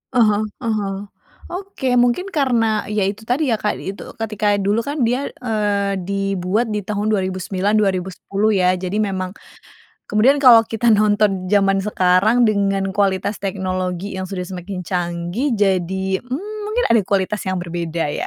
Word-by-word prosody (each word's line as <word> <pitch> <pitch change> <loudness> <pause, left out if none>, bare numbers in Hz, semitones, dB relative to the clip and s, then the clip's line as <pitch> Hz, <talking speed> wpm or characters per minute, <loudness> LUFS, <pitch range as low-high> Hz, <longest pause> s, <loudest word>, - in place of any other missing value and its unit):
Ah 240 - +6
hah 210 0 +2 0.2
ah 230 - 0
hah. 195 -1 -3 0.6
Oke 355 -9 -2
mungkin 245 +10 +2
karena 230 - +1
ya 210 -1 0
itu 205 +2 -4
tadi 265 +2 +1
ya 225 - +3
Kak, 210 - -1
eee, - - -5
itu 200 - -10 0.2
ketika 210 -2 0
dulu 200 +3 +1
kan 285 0 -2
dia, 255 +4 0 0.2
eee, 205 -3 0
dibuat 195 +3 -1
di 210 - -1
tahun 210 +1 -2
2009, 190 +1 -1
2010 195 +1 0
ya 185 -1 +3
jadi 185 +1 -4
memang 190 -3 -1 0.8
kemudian 235 +7 +4
kalau 245 -4 +9
kita 225 +1 -1
nonton 205 -2 +2
jaman 195 -1 +3
sekarang 205 +4 +3
dengan 195 -2 +1
kualitas 200 0 +1
teknologi 185 -1 -3
yang 190 - -3
sudah 180 -1 -4
semakin 185 0 -6
canggih 175 - -2
jadi, 190 -1 0
mmm, 380 +13 -5
mungkin 480 +3 0
ada 230 - +5
kualitas 200 +2 0
yang 185 - 0
berbeda 170 -2 -3
ya. - - -3
200 Hz, 160 wpm, -20 LUFS, 185-225 Hz, 0.8 s, kalau